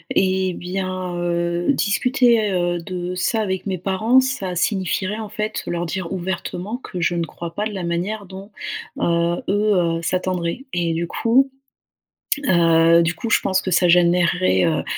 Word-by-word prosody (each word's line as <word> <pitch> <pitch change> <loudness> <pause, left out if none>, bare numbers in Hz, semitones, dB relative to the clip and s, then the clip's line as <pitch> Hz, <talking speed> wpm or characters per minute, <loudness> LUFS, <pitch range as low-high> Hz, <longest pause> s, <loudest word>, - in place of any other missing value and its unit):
Et 190 -1 +2
bien, 185 0 -4
heu, 170 0 -1
discuter 235 -2 +2
heu, 175 -1 0
de 180 +1 -5
ça 200 +5 0
avec 190 -2 -2
mes 190 -1 -1
parents, 200 +8 +3
ça 200 -9 -3
signifierait, 190 +2 -1
en 215 -2 -6
fait, 215 0 -3
leur 175 0 -2
dire 175 0 -4
ouvertement 190 +3 -4
que 185 -8 -7
je 170 - +1
ne 170 -1 0
crois 170 0 -8
pas 210 +4 -2
de 215 - -7
la 190 -3 -4
manière 180 +5 -2
dont, 195 +2 -10 0.5
heu, 170 0 +1
eux, 205 +2 +2
heu, 165 -2 +1
s'attendraient. 185 +5 -2
Et 170 -2 0
du 170 +1 -1
coup, 255 +9 +2 1.0
heu, 165 -2 +5
du 170 +1 0
coup, 225 +7 -5
je - - +4
pense 190 -1 0
que 185 - -3
ça 180 0 +3
générerait, 170 - +3
heu, - - 0
185 Hz, 170 wpm, -21 LUFS, 170-205 Hz, 1.0 s, heu